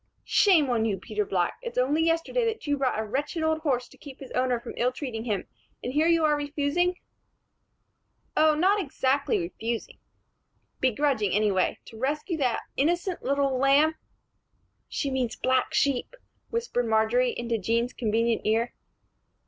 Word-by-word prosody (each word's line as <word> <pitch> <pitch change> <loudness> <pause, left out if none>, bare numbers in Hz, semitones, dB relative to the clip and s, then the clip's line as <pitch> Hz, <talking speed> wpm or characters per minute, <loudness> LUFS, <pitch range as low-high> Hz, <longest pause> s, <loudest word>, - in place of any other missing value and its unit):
"Shame 350 -8 +4
on 230 -2 +1
you, 205 -3 0
Peter 210 +2 -3
Black. 180 -3 -1
It's 475 -1 -7
only 275 +5 +2
yesterday 330 +9 +1
that 450 -1 -2
you 290 -1 +1
bought 270 -5 0
a 220 - -1
wretched 290 +8 -2
old 315 0 +1
horse 260 -6 -1
to - - -19
keep 275 -3 -11
his 270 - -10
owner 250 -1 +1
from - - -8
ill 245 +1 +2
treating 250 -4 -5
him; 210 -5 -1 0.4
and 250 - -3
here 310 +3 +3
you 335 -1 +4
are 300 -1 +3
refusing 290 +5 0 0.7
" - - -47
"Oh, 310 0 +5
not 385 +6 +3
exactly 275 -3 0
refusing 225 +7 -4 0.4
" - - -46
"Begrudging, 255 -5 +1
anyway, 200 -2 +2
to 220 - -12
rescue 300 - -1
that 255 -5 0
innocent 345 +5 0
lamb 275 +2 +3 0.5
" - - -45
"She 280 - -2
means 255 -3 -1
black 255 0 +1
sheep," 280 - +1 0.3
whispered 455 - -1
Marjory, 225 +3 +2
into 235 -1 -1
Jean's 230 +5 0
convenient 230 0 0
ear. 225 +3 +1
265 Hz, 160 wpm, -27 LUFS, 230-305 Hz, 0.7 s, Oh